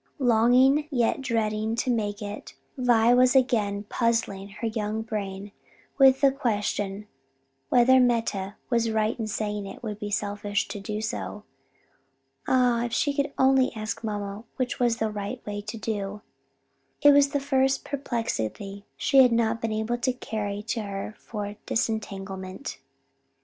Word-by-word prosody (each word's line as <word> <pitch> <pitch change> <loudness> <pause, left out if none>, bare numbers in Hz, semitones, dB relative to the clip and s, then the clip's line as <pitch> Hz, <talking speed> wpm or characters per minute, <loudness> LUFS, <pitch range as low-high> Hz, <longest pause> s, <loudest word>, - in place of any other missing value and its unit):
Longing, 255 +3 +4
yet 245 -3 +1
dreading 220 -3 -1
to 250 +2 0
make 210 -2 -2
it, 205 +1 -7 0.2
Vi 240 -2 +4
was 250 +1 +5
again 215 -6 +2
puzzling 210 -3 -1
her 205 +4 -6
young 220 -1 -2
brain 200 -3 -5 0.5
with 270 -1 +6
the 275 -1 +6
question 210 -5 -2 0.6
whether 255 +2 +6
Meta 225 -5 +1 0.2
was 230 -1 +2
right 220 +2 0
in 220 - -2
saying 210 -1 -3
it 195 - -10
would 210 -2 -5
be 210 - -4
selfish 205 0 -1
to 205 - -5
do 210 +2 -4
so. 215 -1 -4 1.0
Ah, 245 -2 +3
if 240 - -4
she 285 +4 +1
could 280 0 -1
only 265 -1 +4
ask 215 +1 -4
mamma 205 -1 -4
which 255 -1 -2
was 240 -2 +2
the 220 -2 -1
right 210 +4 -4
way 205 0 -4
to 215 +2 -7
do! 205 -2 -4 0.8
This 290 0 +8
was 280 0 +5
the 285 - 0
first 270 -1 +1
perplexity 205 - -3
she 275 - +3
had 250 -2 +6
not 230 0 +1
been 225 - -1
able 220 +3 -1
to 255 +1 +1
carry 210 -4 -4
to 225 - -1
her 200 0 -5
for 205 -2 -6
disentanglement. 195 -1 -3
220 Hz, 150 wpm, -26 LUFS, 205-245 Hz, 1.0 s, This